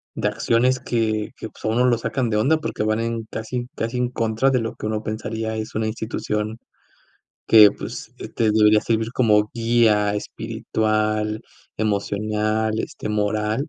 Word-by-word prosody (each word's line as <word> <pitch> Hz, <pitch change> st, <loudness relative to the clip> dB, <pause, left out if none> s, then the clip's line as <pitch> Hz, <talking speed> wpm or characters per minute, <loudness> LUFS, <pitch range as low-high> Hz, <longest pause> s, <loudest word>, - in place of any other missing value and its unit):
de -, -, 0 dB
acciones 125 Hz, +2 st, +1 dB
que 110 Hz, -3 st, -1 dB
que, -, -, -6 dB
pues, -, -, -18 dB
a 110 Hz, -, 0 dB
uno 120 Hz, +3 st, +2 dB
lo 120 Hz, -2 st, +3 dB
sacan 120 Hz, 0 st, -1 dB
de 105 Hz, -, 0 dB
onda 140 Hz, +9 st, +3 dB
porque 155 Hz, -8 st, -3 dB
van 110 Hz, +1 st, +1 dB
en 115 Hz, 0 st, -2 dB
casi 120 Hz, +3 st, -4 dB
casi 115 Hz, +2 st, -2 dB
en 125 Hz, -1 st, +1 dB
contra 115 Hz, +2 st, +1 dB
de 130 Hz, -2 st, +2 dB
lo 115 Hz, 0 st, -4 dB
que -, -, -7 dB
uno 110 Hz, 0 st, -1 dB
pensaría 110 Hz, +1 st, -4 dB
es 110 Hz, 0 st, -5 dB
una 110 Hz, 0 st, 0 dB
institución 110 Hz, 0 st, -3 dB, 0.9 s
que, 105 Hz, -3 st, +8 dB
pues, -, -, -8 dB, 0.2 s
te 110 Hz, -2 st, +2 dB
debería 105 Hz, 0 st, +5 dB
servir 115 Hz, 0 st, -1 dB
como 105 Hz, -4 st, +3 dB
guía 115 Hz, -3 st, +3 dB
espiritual, 110 Hz, 0 st, -1 dB, 0.4 s
emocional, 110 Hz, +1 st, 0 dB
este, 105 Hz, -, -5 dB
moral. 105 Hz, +6 st, -1 dB
110 Hz, 160 wpm, -22 LUFS, 105-115 Hz, 0.9 s, que